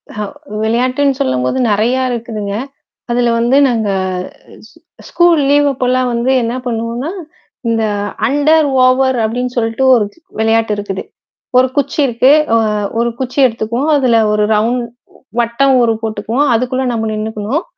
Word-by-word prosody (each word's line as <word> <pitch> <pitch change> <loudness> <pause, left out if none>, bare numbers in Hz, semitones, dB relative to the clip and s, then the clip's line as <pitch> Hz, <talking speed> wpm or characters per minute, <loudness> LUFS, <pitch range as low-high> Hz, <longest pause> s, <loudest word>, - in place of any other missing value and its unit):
ஹ! - - -11 0.4
விளையாட்டுன்னு 255 +5 +1
சொல்லம்போது 130 - 0
நெறையா 235 +6 +1
இருக்குதுங்க. 220 -4 -4 0.6
அதில 240 0 +1
வந்து 240 +3 +2
நாங்க 225 -4 -1 1.2
ஸ்கூல் 345 -3 +3
லீவ் 290 0 +4
அப்போலாம் 255 -1 0
வந்து 235 +2 0
என்ன 230 +1 -2
பண்ணுவோம்னா, 235 +5 -3 0.6
இந்த 225 -1 +1 0.4
அண்டர் 295 +4 +3 0.2
ஓவர் 260 0 +3
அப்படின்னு 245 +3 -2
சொல்லிட்டு 225 +2 0
1 225 - +2
தி - - -25 0.2
வெளையாட்டு 225 0 +1
இருக்குது. 200 -2 -4 0.6
1 255 - +4
குச்சி 285 +1 -1
இருக்கு 250 +1 +2 0.3
அ - - +4 0.4
1 235 0 +1
குச்சி 260 +1 -5
எடுத்துக்குவோம். 235 +5 -2
அதில 255 -5 +2 0.2
1 210 0 +1
ரவுண்ட் 235 +3 0 0.6
வட்டம் 250 +3 +2
ஒரு 230 -1 +2
போட்டுக்குவோம். 220 +5 -1
அதுக்குள்ளே 255 +3 -1
நம்ம 225 -1 -2
நின்னுக்கணும். 215 - -3
240 Hz, 130 wpm, -14 LUFS, 225-260 Hz, 1.2 s, லீவ்